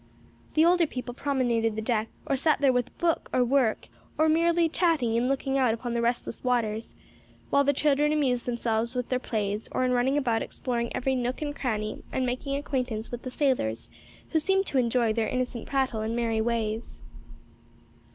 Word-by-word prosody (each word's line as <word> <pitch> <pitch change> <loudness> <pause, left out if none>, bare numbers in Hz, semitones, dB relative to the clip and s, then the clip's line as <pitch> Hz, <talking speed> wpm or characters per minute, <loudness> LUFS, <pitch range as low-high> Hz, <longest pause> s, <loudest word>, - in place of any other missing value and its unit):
The 315 +1 +5
older 345 -1 +4
people 250 -3 -6
promenaded 240 -5 0
the 220 - -2
deck 225 -2 0 0.2
or 275 - +1
sat 300 +3 +2
there 275 -2 +4
with 250 0 -2
book 335 -1 0
or 250 -1 +3
work, 250 -3 +1 0.3
or 315 - +4
merely 335 +1 +3
chatting 315 -9 +1
and 235 +2 +2
looking 270 0 0
out 245 -4 +3
upon 240 +1 -5
the 235 - 0
restless 235 -1 -2
waters, 230 -3 -1 0.6
while 280 - +4
the 285 - +3
children 295 +1 +2
amused 260 -6 +1
themselves 235 0 -1
with 250 -1 -2
their 255 - +1
plays 210 -3 -2
or - - 0
in 250 - +1
running 250 +3 +2
about 235 -6 +1
exploring 235 -2 -3
every 265 +1 0
nook 250 +3 -2
and 290 -1 -3
cranny 215 -4 -2
and 260 - 0
making 255 +3 -2
acquaintance 250 -6 -3
with 240 0 -5
the 255 - -5
sailors 250 - -1 0.4
who 320 - +2
seemed 385 +4 +2
to 275 - +1
enjoy 235 -2 +2
their 220 -1 0
innocent 250 -2 -3
prattle 260 -5 0
and 220 +1 -2
merry 230 -2 0
ways. 225 -1 -2
250 Hz, 185 wpm, -27 LUFS, 230-280 Hz, 0.6 s, The